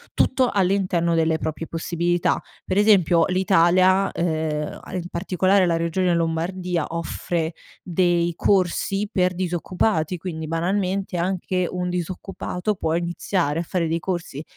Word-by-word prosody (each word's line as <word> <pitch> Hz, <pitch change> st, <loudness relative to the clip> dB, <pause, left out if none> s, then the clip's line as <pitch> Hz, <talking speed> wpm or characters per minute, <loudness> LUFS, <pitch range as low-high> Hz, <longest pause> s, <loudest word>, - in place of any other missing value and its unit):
Tutto 260 Hz, -1 st, +2 dB
all'interno 185 Hz, -3 st, +1 dB
delle 160 Hz, -1 st, +2 dB
proprie 160 Hz, +1 st, -4 dB
possibilità. 170 Hz, +1 st, 0 dB, 0.2 s
Per 185 Hz, -, -1 dB
esempio, 185 Hz, -6 st, +5 dB
l'Italia, 185 Hz, 0 st, +4 dB
uhm, 155 Hz, -3 st, -2 dB
in 180 Hz, -2 st, -3 dB
particolare 185 Hz, +2 st, +2 dB
la 165 Hz, -1 st, +2 dB
regione 170 Hz, +2 st, +1 dB
Lombardia, 170 Hz, +1 st, -1 dB
offre 165 Hz, 0 st, -3 dB, 0.3 s
dei 175 Hz, -1 st, +1 dB
corsi 195 Hz, +2 st, +1 dB
per 180 Hz, -1 st, +2 dB
disoccupati, 180 Hz, -1 st, -1 dB
quindi 160 Hz, -2 st, -5 dB
banalmente 185 Hz, +3 st, -1 dB
anche 185 Hz, 0 st, -1 dB
un 180 Hz, 0 st, -3 dB
disoccupato 180 Hz, +2 st, -3 dB
può 160 Hz, -4 st, -1 dB
iniziare 170 Hz, -2 st, -1 dB
a -, -, -1 dB
fare 170 Hz, -1 st, -1 dB
dei 165 Hz, +1 st, 0 dB
corsi 170 Hz, -6 st, -4 dB
175 Hz, 125 wpm, -23 LUFS, 165-185 Hz, 0.3 s, esempio